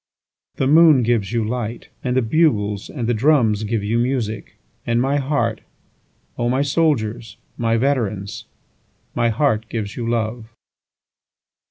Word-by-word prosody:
9The 130 - +1
moon 155 -3 +6
gives 115 -4 0
you 115 -1 0
light, 120 -1 -4
And 125 0 0
the 130 - +3
bugles 110 -7 +1
and 125 -6 -4
the 120 - +2
drums 115 -4 +2
give 110 -1 -2
you 110 +3 0
music; 120 -4 -2 0.3
And 115 0 0
my 135 +3 +1
heart, 130 -6 -1 0.8
O 120 - +1
my 130 +3 +1
soldiers, 120 -8 -1 0.2
my 115 -1 0
veterans, 110 -7 -1 0.7
My 115 - +1
heart 110 -3 0
gives 105 -3 -4
you 115 -1 -3
love. 115 0 -2
115 Hz, 140 wpm, -20 LUFS, 110-130 Hz, 0.8 s, moon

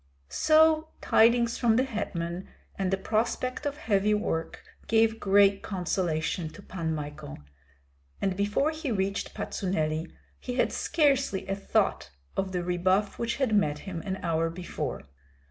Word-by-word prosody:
So 315 - +4
tidings 235 +1 +3
from 230 -3 +3
the 255 - +3
hetman 185 -7 -4 0.3
and 190 -1 -1
the 195 - +1
prospect 235 +7 -1
of 290 0 -4
heavy 210 -4 +2
work 165 -6 -3 0.2
gave 225 0 +3
great 200 0 +4
consolation 175 -3 -1
to 200 - -12
Pan 165 -3 -3
Michael; 150 0 -7 0.8
and 190 -1 0
before 205 +10 +1
he 310 -4 -4
reached 195 -1 -2
Patsuneli, 160 -4 -2 0.3
he 250 - -5
had - - +1
scarcely 275 - +1
a 195 - -1
thought 195 - 0 0.3
of 190 -1 -1
the 180 -1 -2
rebuff 185 +3 +1
which 235 0 -1
had 265 -5 0
met 150 -8 +2
him 180 -4 -5
an 190 +1 -3
hour 165 0 +1
before. 165 -5 -5
195 Hz, 145 wpm, -28 LUFS, 175-230 Hz, 0.8 s, So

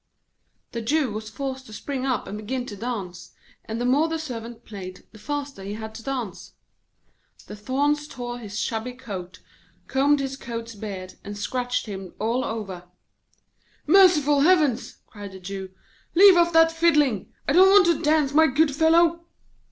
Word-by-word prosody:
The 235 - -4
Jew 275 +2 +1
was 215 +1 -6
forced 265 +2 -5
to 215 - -12
spring 270 +3 -4
up 250 -5 -1
and 205 - -6
begin 245 +4 -3
to 205 - -8
dance, 200 -5 -6 0.3
and 225 +1 -4
the 245 - -1
more 280 +6 +3
the 325 0 -2
Servant 240 -6 -7
played, 185 -4 -9
the 215 - -15
faster 285 -1 -5
he 200 +2 -5
had 220 0 -7
to 230 - -9
dance. 245 -6 -5 0.9
The 210 - -9
thorns 285 +7 0
tore 245 -3 -6
his 210 -2 -7
shabby 225 +2 -2
coat, 185 -7 -8 0.4
combed 280 +2 +2
his 270 -1 -3
goat's 230 -3 -6
beard, 195 -3 -8
and 205 0 -7
scratched 245 +4 -2
him 195 -4 -8
all 230 +4 0
over. 195 -6 -5 1.0
'Merciful 305 -5 +5
Heavens!' 300 -7 +2
cried 205 -2 -10
the 190 - -10
Jew. 190 +1 -6 0.5
'Leave 385 +1 +8
off 345 0 +4
that 325 0 +5
fiddling! 300 - +2 0.2
I 275 - +2
don't 375 +3 +7
want 400 -1 +7
to 340 -2 +2
dance, 300 -3 +2
my 320 +1 +6
good 290 +1 +2
fellow.' 335 +2 +3
250 Hz, 165 wpm, -24 LUFS, 215-295 Hz, 1.0 s, Leave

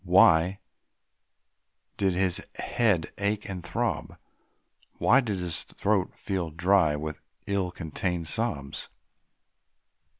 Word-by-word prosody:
Why 90 0 +5 1.4
did 95 -2 +2
his 95 -1 +1
head 105 -9 +1
ache 100 +1 -1
and 90 -3 -5
throb? 85 - -2 0.8
Why 125 +4 +5
did 105 -6 -2
his 90 -2 -2
throat 100 -3 0
feel 95 -4 -2
dry 85 -1 +3
with 75 +1 -5 0.2
ill 100 -2 0
contained 85 0 -3
sobs? 80 -9 -2
90 Hz, 100 wpm, -28 LUFS, 85-100 Hz, 1.4 s, Why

